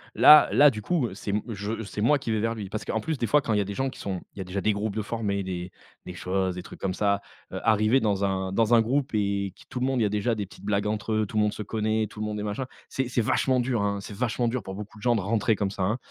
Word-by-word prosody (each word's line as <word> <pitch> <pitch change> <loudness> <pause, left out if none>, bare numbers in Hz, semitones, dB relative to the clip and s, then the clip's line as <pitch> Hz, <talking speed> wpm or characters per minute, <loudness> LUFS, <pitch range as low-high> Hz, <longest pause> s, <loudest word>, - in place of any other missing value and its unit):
Là 150 -1 +9
là 145 - +7
du 110 -5 -6
coup, 160 -6 +1
heu, - - -8
c'est 100 - -4
m 105 - 0
je 105 +1 -4
c'est 105 0 -5
moi 140 +6 +4
qui 125 - -6
vais 110 - +1
vers 115 +1 0
lui. 105 -4 -6
Parce 105 +1 -5
qu'en - - -1
plus, 160 -3 -2
des 120 - -1
fois, 145 +5 +4
quand 115 -5 -1
il - - +2
y - - +3
a - - +1
des 100 +1 -5
gens 135 +4 -1
qui - - -12
sont 95 -3 -4
il - - -20
y - - -4
a - - -2
déjà 95 +2 -4
des 105 - +2
groupes 105 0 -3
de 110 - 0
formés 105 -2 -2
des 90 -1 -5 0.3
des - - -7
choses, 95 +1 -1
des 90 - -5
trucs - - -12
comme 95 -1 -1
ça, 100 0 +1 0.3
heu, - - -4
arriver 110 +3 +4
dans 100 -4 0
un 95 -1 -1
dans 115 +2 +4
un 115 - +6
groupe 135 +4 0
et 100 -2 0
qui - - -18
tout 125 - -4
le 130 - +1
monde 135 -2 0
il - - +4
y - - +3
a 105 - +1
déjà 105 +3 0
des 105 -2 -3
petites - - -16
blagues 105 0 0
entre 105 +1 -2
eux, 110 0 +2
tout 110 - -5
le - - +4
monde 105 - +1
se 105 - -5
connaît, 110 +1 0
tout 105 - -12
le 110 - -2
monde 105 0 -3
est 105 - -3
machin. 105 +5 -3 0.2
C'est 135 -2 -2
c'est 125 - +1
vachement 130 +3 +2
dur, 120 -3 0
hein, 100 0 0
c'est 105 - -8
vachement 120 +1 0
dur 120 +1 -1
pour 95 -1 -7
beaucoup 105 +1 -9
de - - -15
gens 120 -1 +3
de 105 - 0
rentrer 110 +2 +1
comme 100 -1 -1
ça, 100 - -3
hein. 105 +5 +1
105 Hz, 335 wpm, -26 LUFS, 100-115 Hz, 0.3 s, Là